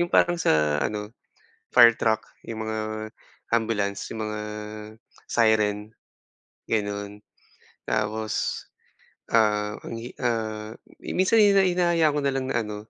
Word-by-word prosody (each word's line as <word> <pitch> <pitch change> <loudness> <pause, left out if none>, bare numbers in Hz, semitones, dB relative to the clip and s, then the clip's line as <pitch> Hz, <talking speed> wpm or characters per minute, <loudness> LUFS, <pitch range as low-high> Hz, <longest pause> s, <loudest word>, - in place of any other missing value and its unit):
yung 175 - +1
parang 175 0 +3
sa 75 - +2
ano, 105 +5 -3 0.6
fire 120 -2 +8
truck, 110 -1 +1 0.2
yung 110 -1 -5
mga 110 0 -4 0.4
ambulance, 110 -4 -1
yung 110 - -5
mga 105 0 -4 0.9
siren, 105 -2 +2 0.8
gano'n. 105 -1 -3 0.7
Tapos, 110 0 -1 0.7
ah, 105 -2 +3
ang 115 - -6
hi 120 +2 -8
ah, 110 -2 -2 0.3
minsan 200 +4 +3
hina 200 -2 +5
hinahayaan 170 -4 +2
ko 150 - +1
na 140 - +2
lang 135 -1 -2
na 120 -3 0
ano 105 -1 -6
110 Hz, 120 wpm, -25 LUFS, 105-125 Hz, 0.9 s, fire